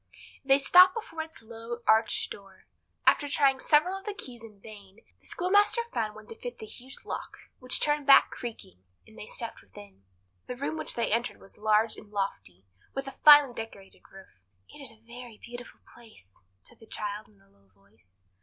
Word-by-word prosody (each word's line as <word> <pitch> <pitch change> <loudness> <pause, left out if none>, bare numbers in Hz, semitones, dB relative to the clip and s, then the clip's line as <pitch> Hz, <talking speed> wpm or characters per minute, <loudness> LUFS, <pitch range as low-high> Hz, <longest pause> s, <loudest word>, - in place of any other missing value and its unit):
They 270 0 +5
stopped 360 +6 +7
before 455 -8 -5
its 320 -6 -10
low, 230 +1 -8
arched 220 +1 +3
door. 195 -1 -12 0.4
After 290 - +4
trying 275 -2 +3
several 310 +8 +3
of 390 0 -9
the 420 -2 -4
keys 245 - -9
in 215 -3 -14
vain, 205 -1 -14 0.2
the - - -10
schoolmaster 410 +6 +2
found 215 -2 -2
one 215 0 -12
to 225 - -7
fit 245 -1 -7
the - - -9
huge 255 +5 -11
lock, - - -6 0.2
which 255 -1 0
turned 295 -1 +1
back 275 - +7
creaking, 95 - -9 0.2
and - - -19
they - - -10
stepped - - -6
within. 100 -1 -15 0.5
The 250 - -5
room 155 -9 -3
which 155 -1 -3
they 235 - -1
entered 235 +2 -1
was 195 - -13
large 215 +1 +2
and 210 - -13
lofty, 195 - -5 0.3
with 270 0 -3
a 270 - -6
finely 290 -4 +7
decorated 215 -4 -10
roof. 190 - -16 0.3
"It - - -13
is 275 - -1
a - - -17
very 240 -1 -11
beautiful 245 +1 -11
place!" 215 - -18 0.2
said - - -10
the 225 - -16
child 210 0 -5
in 100 - -26
a 95 - -27
low 100 0 -30
voice. 100 0 -19
230 Hz, 190 wpm, -28 LUFS, 195-270 Hz, 0.5 s, stopped